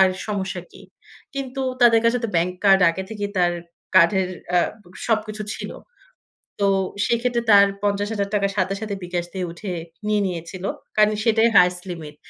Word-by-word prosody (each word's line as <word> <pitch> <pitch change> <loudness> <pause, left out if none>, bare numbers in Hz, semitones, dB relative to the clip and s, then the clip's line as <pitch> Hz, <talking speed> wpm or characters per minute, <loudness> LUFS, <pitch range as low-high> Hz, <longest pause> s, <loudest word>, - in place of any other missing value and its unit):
আর 190 - +7 0.2
সমস্যা 195 -2 -3
কি?" - - -14 0.5
কিন্তু 270 -1 -4 0.2
তাদের 230 -2 +6
কাছে 235 +2 +3
তো - - 0
ব্যাংক 175 +2 +1
কার্ড 195 -1 +6
আগে 190 +3 -5
থেকেই 205 -2 -4
তার 175 -1 +3 0.4
কার্ডের 185 +1 +5 0.3
আ - - +6 0.5
সবকিছু 215 -1 -1
ছিল। - - -6 0.9
তো 200 - +3 0.4
সেক্ষেত্রে 235 0 0
তার 200 0 +8 0.2
৳৫০,০০০ 205 0 0
সাথে, 190 0 0
সাথে, 215 -2 -3
বিকাশ 175 -1 -2
দিয়ে 185 -2 -3
উঠে 185 +3 -7 0.4
নিয়ে 210 -1 +2
নিয়েছিল। 180 +1 -6 0.3
কারণ 215 0 +5
সেটাই 225 0 +4
হাইয়েস্ট 180 0 +5
লিমিট। 155 -4 -8
200 Hz, 150 wpm, -22 LUFS, 180-220 Hz, 0.9 s, তার